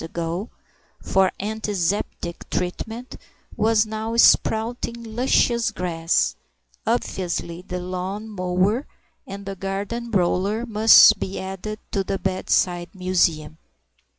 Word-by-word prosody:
ago, 170 +5 -4 0.5
for 190 -1 +2
Anti 215 +1 -3
zeptic 175 -2 -2
treatment, 225 +7 -4 0.4
was 220 0 +3
now 220 +1 -4
sprouting 235 +1 +3
luscious 235 0 +2
grass; 165 -2 0 0.5
obviously 180 -6 -2
the 180 -1 -5
lawn 185 +4 -4
mower 190 +5 0 0.4
and 200 +1 -8
garden 200 +5 -4
roller 200 +3 +1
must 215 -1 +7
be 190 - -4
added 195 +3 -5
to 195 - 0
the 195 - -2
bedside 185 -2 0
museum. 165 -4 0
195 Hz, 100 wpm, -23 LUFS, 180-220 Hz, 0.5 s, must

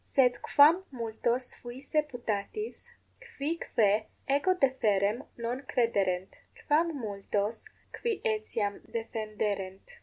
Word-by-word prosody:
Sed 250 -3 +3
quam 320 +6 +6
multos 235 +1 -1
fuisse 265 +5 -1
putatis, 245 - -4 0.3
qui 335 - -4
quae 215 0 +2 0.2
ego 285 +7 +3
deferrem 230 - +2
non 240 +2 -3
crederent? 195 -8 0 0.3
quam 315 0 +2
multos, 205 0 -2 0.3
qui 460 -3 -1
etiam 215 -1 -1
defenderent? 215 - -3
235 Hz, 95 wpm, -30 LUFS, 210-285 Hz, 0.3 s, quam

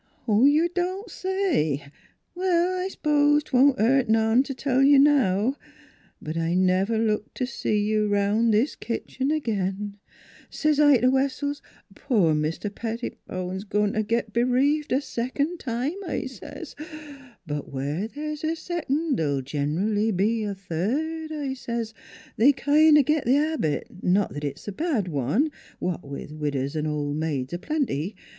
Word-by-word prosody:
" - - -36
You 280 +10 +4
don't 370 +4 -2
say! 350 - 0 0.5
Well, 360 0 +1
I - - -1
s'pose 295 -4 +2
'twon't 265 0 +4
hurt 250 +2 +3
none 225 +2 +4
t' 275 0 -5
tell 260 +1 +1
you 280 +1 +6
now; 265 -4 +3 0.6
but 155 +1 -6
I 165 +1 0
never 185 +4 +2
looked 215 -1 -1
t' 255 - 0
see 230 -4 -1
you 215 0 +1
'round 205 +3 +2
this 220 +7 +2
'ere - - -19 0.2
kitchen 265 +2 -3
agin. 205 -7 -2 0.5
'S - - -8 0.2
I 290 -2 +7
says 235 - +1
t' - - +2
Wessells, 275 +2 0 0.2
* - - -24
Poor 205 - +2
Mr. 155 +7 -2
Pettibone's 190 -5 -5
a - - -11
goin' 210 0 +1
t' 215 - +1
git 225 0 -1
b'reaved 260 +5 +2
a 260 +3 +2
secon' 285 +6 -2
time,' 270 +10 -3
I - - -2
says. 260 - -9 0.3
* 275 -8 -17
But 145 -2 -5
where 145 +9 -2
there's 300 +4 -6
a 320 +1 0
secon' 320 -3 -1
th'll 140 -4 0
gen'ally 165 +11 0
be 215 +3 +1
a 200 -1 -3
third,' 265 - -3
I 290 -3 -3
says. 235 -3 -4 0.4
They 265 +6 +6
kind 300 +3 +5
o' 295 - +6
git 305 +2 +1
th' 250 +3 +4
habit 295 - 0 0.2
not 190 +2 +2
that 145 - -6
it's 145 +5 -5
a - - -2
bad 250 - -1
one, 160 - 0 0.3
what 180 -2 -3
with 140 +1 -8
widows 145 -2 -2
an' 155 0 -1
ol' 145 -1 -2
maids 150 -3 -2
a 175 - -3
plenty. 210 - -2
230 Hz, 165 wpm, -25 LUFS, 185-290 Hz, 0.6 s, I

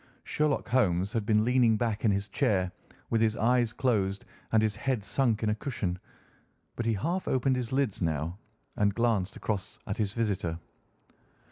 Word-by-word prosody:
Sherlock 150 -2 0
Holmes 100 -5 +2
had 110 -3 -1
been 110 0 +3
leaning 120 -3 +4
back 110 -2 -1
in 110 - +4
his 100 0 0
chair 100 -5 +1 0.4
with 115 - +2
his 110 -1 +3
eyes 120 +1 +2
closed 100 -6 0 0.3
and 110 -1 +4
his 105 -2 +1
head 120 -1 -1
sunk 115 -1 +1
in 110 - +2
a - - +2
cushion, 105 -7 -3 0.8
but 115 - -2
he 115 - +3
half 170 - -2
opened 130 0 +2
his 125 -3 -3
lids 130 -6 0
now 80 +2 -1 0.4
and 100 -1 +2
glanced 115 -5 +1
across 100 -4 -3
at 100 - -3
his 105 -1 -1
visitor. 95 -8 -1
110 Hz, 170 wpm, -29 LUFS, 100-120 Hz, 0.8 s, leaning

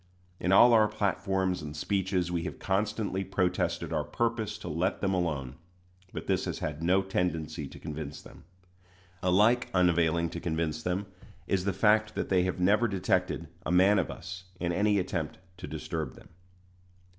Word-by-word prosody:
In 90 - 0
all 120 +5 +8
our 110 -2 +6
platforms 95 -3 0
and 75 0 -7
speeches 95 0 0
we 85 -1 0
have - - -5
constantly 100 0 -1
protested 95 -1 -1
our - - +1
purpose 115 -3 -1
to - - -9
let 85 +4 -1
them 95 -1 0
alone; 75 -7 -2 0.5
but - - -6
this - - 0
has - - -3
had 75 +1 -4
no 95 +3 +3
tendency 80 -5 -2
to - - -12
convince 75 -1 -6
them. - - -14 0.8
Alike 105 +7 +3
unavailing 85 -2 +3
to 85 - -5
convince 80 -2 -2
them 90 +4 -1 0.4
is 95 -1 0
the 100 - +2
fact 110 +1 +3
that - - -2
they 95 -2 +4
have 90 0 -2
never 105 +6 +4
detected 95 -4 0 0.2
a - - -2
man 95 +3 +5
of 90 - -1
us 95 +2 -8
in 85 -1 -1
any 105 +3 +2
attempt 90 -4 -2 0.2
to 90 - -7
disturb 80 -1 -4
them. - - -16
90 Hz, 170 wpm, -29 LUFS, 85-100 Hz, 0.8 s, all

